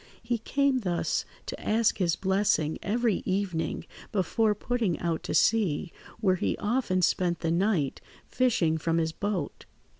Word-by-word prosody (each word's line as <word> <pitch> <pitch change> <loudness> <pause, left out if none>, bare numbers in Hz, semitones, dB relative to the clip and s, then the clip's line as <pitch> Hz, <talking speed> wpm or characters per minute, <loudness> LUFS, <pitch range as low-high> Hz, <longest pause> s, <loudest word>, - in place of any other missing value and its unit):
He 235 0 -1
came 275 +3 +1
thus 180 -6 -1 0.2
to - - -6
ask 220 0 +2
his 175 -3 +2
blessing 190 -5 +1
every 225 0 +1
evening 185 -4 -2 0.3
before 210 +2 +1
putting 225 -5 -1
out 170 -2 -2
to - - -2
sea, 195 -6 +2 0.3
where 190 -4 +2
he - - -1
often 205 -5 0
spent 175 0 +1
the 165 - 0
night 175 -5 +1 0.2
fishing 180 -11 +1
from 165 +1 0
his 160 -1 +1
boat. 200 +1 -3
195 Hz, 145 wpm, -28 LUFS, 170-225 Hz, 0.3 s, ask